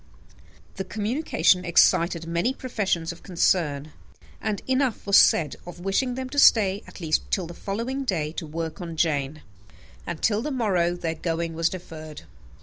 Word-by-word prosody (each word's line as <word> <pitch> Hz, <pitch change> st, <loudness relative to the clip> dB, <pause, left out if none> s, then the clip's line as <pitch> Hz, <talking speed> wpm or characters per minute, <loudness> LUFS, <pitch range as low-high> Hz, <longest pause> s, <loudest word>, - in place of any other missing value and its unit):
The 190 Hz, -, -2 dB
communication 210 Hz, -, +1 dB
excited 170 Hz, -1 st, +3 dB
many 170 Hz, +10 st, 0 dB
professions 195 Hz, -10 st, -2 dB
of 170 Hz, -, -12 dB
concern; 155 Hz, -5 st, 0 dB, 0.5 s
and 215 Hz, -2 st, -2 dB
enough 260 Hz, -2 st, 0 dB
was 200 Hz, -1 st, +3 dB
said 155 Hz, -3 st, +4 dB
of 175 Hz, -1 st, -9 dB
wishing 245 Hz, +7 st, 0 dB
them 260 Hz, 0 st, -4 dB
to 285 Hz, +2 st, -1 dB
stay 205 Hz, -6 st, +5 dB
at -, -, -12 dB
least 160 Hz, -3 st, -1 dB
till 190 Hz, -4 st, 0 dB
the 170 Hz, -, -8 dB
following 230 Hz, +10 st, -3 dB
day 160 Hz, -, -1 dB
to 160 Hz, 0 st, -6 dB
work 165 Hz, +3 st, -5 dB
on 170 Hz, -2 st, -6 dB
Jane; 150 Hz, -2 st, 0 dB, 0.6 s
and 170 Hz, -2 st, -4 dB
till 215 Hz, -1 st, +1 dB
the 295 Hz, -, -3 dB
morrow 190 Hz, -10 st, +1 dB
their 165 Hz, -2 st, -3 dB
going 165 Hz, 0 st, -3 dB
was 165 Hz, +1 st, +1 dB
deferred. 155 Hz, -4 st, -9 dB
175 Hz, 160 wpm, -25 LUFS, 165-215 Hz, 0.6 s, stay